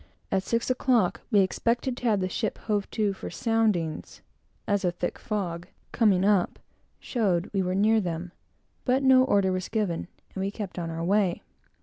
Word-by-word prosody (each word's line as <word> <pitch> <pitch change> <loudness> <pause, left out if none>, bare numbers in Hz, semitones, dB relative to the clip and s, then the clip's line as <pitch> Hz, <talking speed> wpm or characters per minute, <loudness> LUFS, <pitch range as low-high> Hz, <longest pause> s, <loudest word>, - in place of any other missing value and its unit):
At 190 - +2
six 230 +5 -1
o'clock 245 -6 +2
we 210 -5 +5
expected 235 +6 0
to - - -7
have 210 -4 +2
the 185 - 0
ship 215 +3 -2
hove 205 -2 -2
to 210 -3 0
for 195 - -7
soundings, 215 -9 -1 0.4
as 205 -1 +1
a 180 - +3
thick 175 0 -4
fog, 180 -5 -3 0.2
coming 195 -5 +3
up 200 -3 +2 0.4
showed 195 -7 0
we 195 - +1
were 185 0 -1
near 215 +3 +4
them; 175 -1 -4 0.5
but 260 +1 +1
no 260 -1 +6
order 200 -7 +2
was 185 0 -3
given, 195 -7 -1 0.3
and 190 - -4
we 195 - 0
kept 200 -3 -6
on 165 -1 -3
our 165 0 -4
way. 195 0 +1
200 Hz, 180 wpm, -27 LUFS, 180-225 Hz, 0.5 s, no